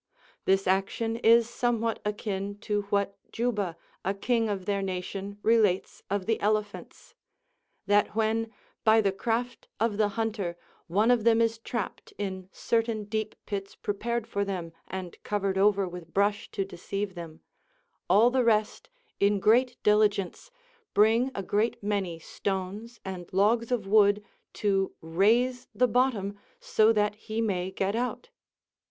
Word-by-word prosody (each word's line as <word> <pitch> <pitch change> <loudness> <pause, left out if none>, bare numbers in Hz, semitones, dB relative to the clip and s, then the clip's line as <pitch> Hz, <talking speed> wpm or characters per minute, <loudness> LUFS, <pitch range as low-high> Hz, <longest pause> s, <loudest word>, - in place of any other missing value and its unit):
This 195 +1 +3
action 195 +4 0
is 230 0 +5
somewhat 235 -2 -1
akin 205 -1 -3
to 210 -1 0
what 200 -1 0
Juba, 210 -8 -1 0.3
a 195 - -1
king 225 +2 +1
of 195 -3 -3
their 200 0 0
nation 195 +1 -4
relates 215 -5 +2
of 200 -1 -1
the 225 0 +1
elephants: 210 0 -2 0.7
"That 205 +1 +2
when, 225 0 0 0.3
by 220 0 +6
the 200 -2 +2
craft 235 +5 -2
of 220 -2 +1
the 215 -1 +3
hunter, 210 -6 -2 0.3
one 210 +7 +3
of 240 -3 +3
them 230 0 +4
is 230 0 +1
trapped 230 -2 -5
in 190 -2 -4
certain 225 -2 0
deep 215 +1 -3
pits 195 -1 -5
prepared 235 +3 -2
for 200 -2 -1
them, 180 -4 -4
and 185 -2 -7
covered 200 -2 -1
over 200 0 +3
with 175 -2 -9
brush 205 +1 +1
to 195 - -2
deceive 195 +1 -4
them, 165 -3 -9 0.7
all 215 +6 +6
the 255 0 +2
rest, 220 - +1 0.3
in 200 0 +3
great 240 +5 +3
diligence, 210 - +2 0.5
bring 225 +5 +4
a 195 - -3
great 210 +3 0
many 200 -5 -1
stones 195 +7 -4
and 185 -2 -6
logs 220 +5 +2
of 235 -5 0
wood 205 0 +4 0.3
to 195 -2 0
raise 230 +10 +2
the 250 - +4
bottom 215 -5 0 0.2
so 225 - +3
that 210 -1 +2
he 215 +1 -5
may 190 -5 0
get 195 +2 -1
out." 250 - -3
205 Hz, 145 wpm, -28 LUFS, 195-225 Hz, 0.7 s, by